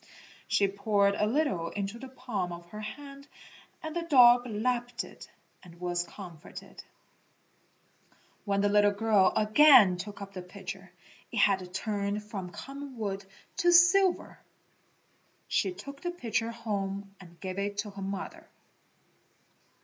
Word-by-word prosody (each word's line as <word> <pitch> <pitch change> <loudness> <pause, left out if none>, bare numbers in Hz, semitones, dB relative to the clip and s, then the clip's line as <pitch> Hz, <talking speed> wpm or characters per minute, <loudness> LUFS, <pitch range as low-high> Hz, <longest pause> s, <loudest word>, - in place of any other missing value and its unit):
She 200 - +3
poured 200 0 +2
a 210 +1 +1
little 235 - 0
into 200 +3 -4
the 265 - -8
palm 245 -9 -4
of 170 0 -8
her 215 - -7
hand 280 +5 -9 0.6
and 315 0 -5
the 345 - 0
dog 250 -6 +6
lapped 240 +2 -1
it - - -13 0.3
and 170 -2 -15
was 175 -1 -1
comforted. 175 -2 -11 1.6
When 200 -1 0
the 205 - +3
little 205 0 +5
girl 205 -2 +3
again 215 -3 +7
took 200 +3 -7
up 200 0 -8
the 185 - -6
pitcher, 190 0 -9 0.4
it - - -5
had 190 -3 +2
turned 205 +1 -2
from 200 -4 -6
common 275 +5 -9
wood 200 -3 -3 0.3
to 350 - +4
silver. 355 +2 +4 1.1
She 190 - +1
took 275 +10 -10
the 350 - -2
pitcher 230 -9 -2
home 200 -4 -4
and 170 -2 -15
gave 185 0 -5
it 200 0 -3
to 210 0 -3
her 195 0 -9
mother. 195 0 -6
205 Hz, 140 wpm, -29 LUFS, 195-245 Hz, 1.6 s, again